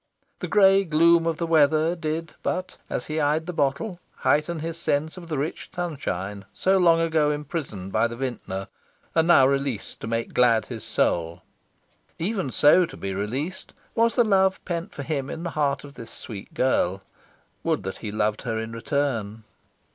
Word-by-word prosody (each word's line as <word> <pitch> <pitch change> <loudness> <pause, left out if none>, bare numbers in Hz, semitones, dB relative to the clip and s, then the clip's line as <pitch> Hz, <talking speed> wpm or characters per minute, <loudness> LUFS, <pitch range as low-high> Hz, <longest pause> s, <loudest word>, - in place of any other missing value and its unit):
The - - -3
grey 195 -1 +5
gloom 165 0 +4
of 165 -2 0
the 170 - -1
weather 160 +1 +3
did 160 0 -3
but, 185 0 -2
as - - -3
he 155 +1 -2
eyed 150 +2 +1
the 180 - -4
bottle, 145 +6 -1 0.2
heighten 160 +3 +1
his 165 +1 -4
sense 155 +1 0
of 180 -2 -10
the 155 -3 -2
rich 145 +4 -3
sunshine 105 - -4
so 190 0 +2
long 170 -2 +5
ago 160 -2 +2
imprisoned 145 - -4
by 110 +3 +2
the 115 - -7
vintner 115 -7 -4 0.5
and 160 0 +3
now 155 -6 +7
released 135 -4 -1
to - - -6
make 115 0 -2
glad 115 -3 +4
his 115 -4 -7
soul. 85 0 0 0.7
Even 190 -4 -1
so 160 +7 +5
to - - -11
be 95 0 -4
released 130 - -4 0.2
was 230 0 +2
the 240 - +5
love 190 -3 +3
pent 175 +2 -3
for 140 - -6
him 140 -2 -2
in 165 - -5
the 170 - -3
heart 140 -2 0
of 145 -1 -11
this 115 -5 -10
sweet 105 -3 -9
girl. 95 -7 +1 0.6
Would - - 0
that 95 +1 -5
he 110 - -6
loved 105 0 0
her 115 -3 -2
in 110 0 -4
return!... 115 -3 -2
150 Hz, 180 wpm, -25 LUFS, 115-170 Hz, 0.7 s, now